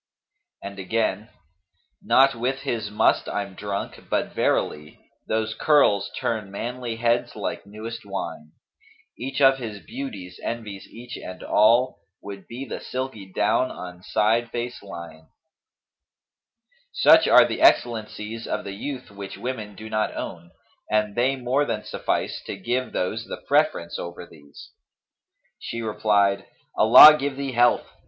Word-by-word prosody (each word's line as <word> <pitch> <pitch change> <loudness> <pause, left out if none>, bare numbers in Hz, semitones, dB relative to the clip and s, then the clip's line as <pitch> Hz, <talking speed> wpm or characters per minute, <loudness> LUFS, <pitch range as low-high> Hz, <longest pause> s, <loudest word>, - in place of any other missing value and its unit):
'[FN#239] 100 - -5
And 100 - -12
again, 110 +3 -1 0.7
'Not 135 +1 +4
with 130 +3 -2
his 115 -6 -3
must 105 - +2
I'm 100 -1 -3
drunk, 100 +1 -6
but - - -1
verily 75 0 -1
* - - -46
Those 110 0 -1
curls 125 -5 +3
turn 110 -4 -2
manly 120 +3 -5
heads 120 +1 0
like - - -5
newest 110 +3 -7
wine[FN#240] 80 -6 -6 0.7
Each 135 +3 -3
of 135 0 +6
his 110 -4 -6
beauties 100 -10 -7
envies 105 -4 -5
each, 120 +2 -9
and 90 - -9
all 120 +5 +3
* 95 - -49
Would 100 -1 -9
be 125 +3 -7
the - - -6
silky 125 -7 -6
down 105 +6 +1
on 90 -1 -9
side 110 +3 +1
face 120 +1 -5
li'en.' 85 -4 -10 1.6
Such - - +6
are - - +8
the - - -4
excellencies 115 - +1
of - - -2
the 100 - -6
youth 130 +3 -6
which 100 -1 -8
women 110 -5 -5
do 110 +3 -9
not 110 -1 -1
own, 85 0 -6 0.4
and 105 -1 +1
they 125 +4 +1
more 130 +2 0
than 110 -6 -3
suffice - - -2
to - - -5
give 125 +6 -2
those 90 - -2
the - - -6
preference 85 0 +1
over 85 0 -7
these.' 70 -4 -15 0.9
She 115 - -5
replied, 100 -2 +1 0.3
'Allah 155 0 +10
give 140 -1 -3
thee 140 -1 -3
health! 120 0 +3
110 Hz, 145 wpm, -24 LUFS, 100-125 Hz, 1.6 s, Allah